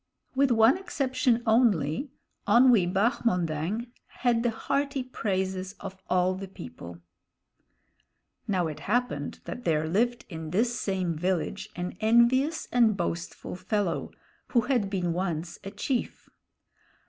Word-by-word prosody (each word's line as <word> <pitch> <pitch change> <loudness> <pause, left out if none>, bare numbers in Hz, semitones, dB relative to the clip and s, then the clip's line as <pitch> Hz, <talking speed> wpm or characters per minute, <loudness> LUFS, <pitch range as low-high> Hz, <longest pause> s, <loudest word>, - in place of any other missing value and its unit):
With 275 +1 +3
one 235 +7 +5
exception 255 -9 0
only, 220 - +2 0.4
Onwee 235 -8 +5
Bahmondang 195 - 0 0.3
had 235 -2 +4
the 240 - +2
hearty 275 +4 -1
praises 190 -5 -2
of 190 0 -8
all 185 0 +3
the 195 +1 -6
people. 85 - -10 1.5
Now 185 -3 +1
it 155 -2 -4
happened 245 - -1
that 245 - -6
there 155 -2 +1
lived 235 +8 0
in 160 -3 -7
this 230 +8 +1
same 185 -4 -1
village 180 +1 -2
an 180 0 -4
envious 240 +8 +3
and 230 -4 +4
boastful 170 -1 -4
fellow, 185 0 -1 0.4
who 240 - +3
had 235 -5 0
been 180 -4 -1
once 170 -2 -3
a 195 - -5
chief. 240 +5 -3
200 Hz, 125 wpm, -28 LUFS, 175-240 Hz, 1.5 s, one